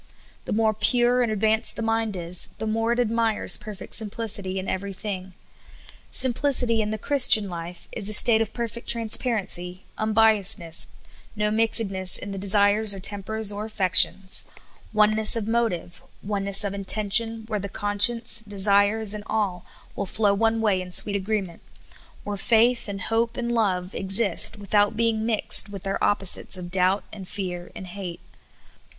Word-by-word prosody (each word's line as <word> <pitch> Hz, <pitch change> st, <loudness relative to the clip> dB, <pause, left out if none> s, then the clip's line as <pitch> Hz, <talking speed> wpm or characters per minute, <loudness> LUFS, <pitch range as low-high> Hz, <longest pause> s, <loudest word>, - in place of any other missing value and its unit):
The -, -, -7 dB
more 220 Hz, 0 st, 0 dB
pure 240 Hz, +3 st, 0 dB
and 235 Hz, -3 st, -2 dB
advanced 220 Hz, +1 st, -1 dB
the 230 Hz, -, -6 dB
mind 225 Hz, -2 st, -3 dB
is, 175 Hz, 0 st, -3 dB
the -, -, -6 dB
more 225 Hz, +1 st, -2 dB
it 240 Hz, -, -2 dB
ad 235 Hz, -3 st, -1 dB
mires 230 Hz, -2 st, +1 dB
perfect 210 Hz, -2 st, -10 dB
simplicity 210 Hz, -3 st, -2 dB
in 190 Hz, -, -6 dB
every 195 Hz, +1 st, -5 dB
thing. 190 Hz, -2 st, -8 dB, 0.8 s
Simplicity 250 Hz, -2 st, +1 dB
in 210 Hz, -, -4 dB
the 215 Hz, -, -5 dB
Christian 235 Hz, -4 st, +5 dB
life 175 Hz, 0 st, -10 dB
is 200 Hz, -, -3 dB
the 215 Hz, -, +4 dB
state 220 Hz, +1 st, +8 dB
of 220 Hz, -, -4 dB
perfect 235 Hz, -1 st, -7 dB
transparency, 210 Hz, -6 st, +3 dB
unbiasedness; 215 Hz, -6 st, +1 dB, 0.5 s
no 210 Hz, 0 st, -2 dB
mixedness 210 Hz, -4 st, +1 dB
in 200 Hz, -, -9 dB
the 195 Hz, -, -7 dB
desires 205 Hz, +1 st, +2 dB
or -, -, -9 dB
tempers 205 Hz, +2 st, -2 dB
or 205 Hz, +1 st, -7 dB
affections; 190 Hz, -2 st, +1 dB, 0.5 s
oneness 215 Hz, +1 st, +2 dB
of 220 Hz, -2 st, -5 dB
motive, 225 Hz, -7 st, -4 dB, 0.2 s
oneness 200 Hz, 0 st, +1 dB
of 200 Hz, -1 st, -5 dB
intention, 215 Hz, +3 st, +2 dB
where 215 Hz, -2 st, -5 dB
the 200 Hz, +1 st, -8 dB
conscience, 225 Hz, +4 st, +4 dB
desires, 205 Hz, +1 st, +1 dB
and 210 Hz, -1 st, -8 dB
will -, -, -6 dB, 0.6 s
all 200 Hz, -, -5 dB
flow 205 Hz, +1 st, -1 dB
one 225 Hz, +2 st, -1 dB
way 200 Hz, -4 st, -1 dB
in 180 Hz, 0 st, -11 dB
sweet 200 Hz, +3 st, +4 dB
agreement; 195 Hz, -3 st, -5 dB, 0.6 s
where 205 Hz, -1 st, -6 dB
faith 235 Hz, +4 st, 0 dB
and 200 Hz, -1 st, -7 dB
hope 230 Hz, +1 st, -3 dB
and 240 Hz, -1 st, -4 dB
love 190 Hz, -6 st, -2 dB
54 -, -, -9 dB
SOUL -, -, -5 dB
FOOD. -, -, -7 dB
exist 205 Hz, +2 st, +1 dB
without 205 Hz, +1 st, -1 dB
being 225 Hz, -1 st, -2 dB
mixed 215 Hz, -2 st, +4 dB
with 195 Hz, -2 st, -10 dB
their 195 Hz, 0 st, -4 dB
opposites 195 Hz, -1 st, +1 dB
of 175 Hz, -1 st, -10 dB
doubt 190 Hz, +1 st, -1 dB
and 195 Hz, -3 st, -11 dB
fear 180 Hz, -3 st, -7 dB
and 190 Hz, -, -10 dB
hate. 180 Hz, -1 st, -9 dB
210 Hz, 165 wpm, -22 LUFS, 195-225 Hz, 0.8 s, state